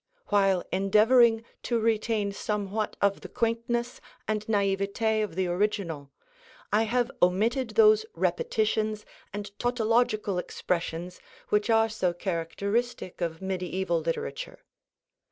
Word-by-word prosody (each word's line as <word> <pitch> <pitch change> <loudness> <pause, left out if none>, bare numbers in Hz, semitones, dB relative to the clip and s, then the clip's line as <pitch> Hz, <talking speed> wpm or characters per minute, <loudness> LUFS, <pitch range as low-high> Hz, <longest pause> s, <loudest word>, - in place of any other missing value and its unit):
While 195 -3 +3
endeavoring 225 +4 +4 0.2
to 235 -1 0
retain 220 -2 +1
somewhat 210 +1 -3
of 200 0 +2
the - - -9
quaintness 235 +1 -1 0.3
and 215 -1 -1
naïveté 205 +1 +1
of 195 -6 -5
the 190 0 +1
original, 175 -6 -1 0.6
I 220 +2 +4
have 245 +1 +1
omitted 225 +8 +2
those 435 -1 +6
repetitions 215 - 0 0.3
and 205 0 -6
tautological 225 -5 +1
expressions 175 0 -3 0.3
which 210 +2 +1
are 225 0 +4
so 190 -5 -1
characteristic 190 +5 -2
of 165 +1 -3
mediaeval 185 -2 -1
literature. - - -4
210 Hz, 110 wpm, -27 LUFS, 190-230 Hz, 0.6 s, those